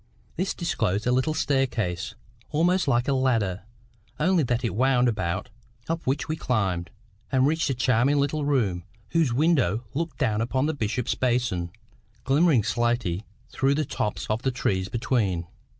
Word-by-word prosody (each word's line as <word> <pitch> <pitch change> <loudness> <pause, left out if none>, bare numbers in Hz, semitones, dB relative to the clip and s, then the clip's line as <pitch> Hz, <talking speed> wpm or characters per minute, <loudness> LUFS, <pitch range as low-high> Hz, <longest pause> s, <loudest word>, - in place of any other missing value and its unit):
This 185 +3 -1
disclosed 110 - -1
a 125 - +2
little 130 +5 +1
staircase, 125 - -1 0.3
almost 175 +4 +2
like 120 -2 +2
a 140 - +2
ladder, 115 -8 +1 0.6
only 175 +2 +3
that 125 -2 0
it 115 - -1
wound 125 +2 +3
about, 95 -5 -1 0.4
up 165 -2 -3
which 135 +2 0
we 155 - -1
climbed, 95 - -1 0.4
and 130 -1 +3
reached 160 +1 +1
a 135 - 0
charming 125 +3 +2
little 145 +2 0
room, 110 -12 +1 0.3
whose 165 -6 +2
window 125 - +2
looked 165 +2 -3
down 105 0 +1
upon 130 +4 0
the 160 - 0
Bishop's 115 -2 -1
Basin, 120 -9 0 0.5
glimmering 140 -3 +4
slaty 120 -5 0 0.2
through 135 +1 +1
the 155 0 0
tops 105 -4 -3
of 110 +2 -1
the 130 - +1
trees 95 -6 -1
between. 110 -7 0
125 Hz, 155 wpm, -26 LUFS, 110-145 Hz, 0.6 s, glimmering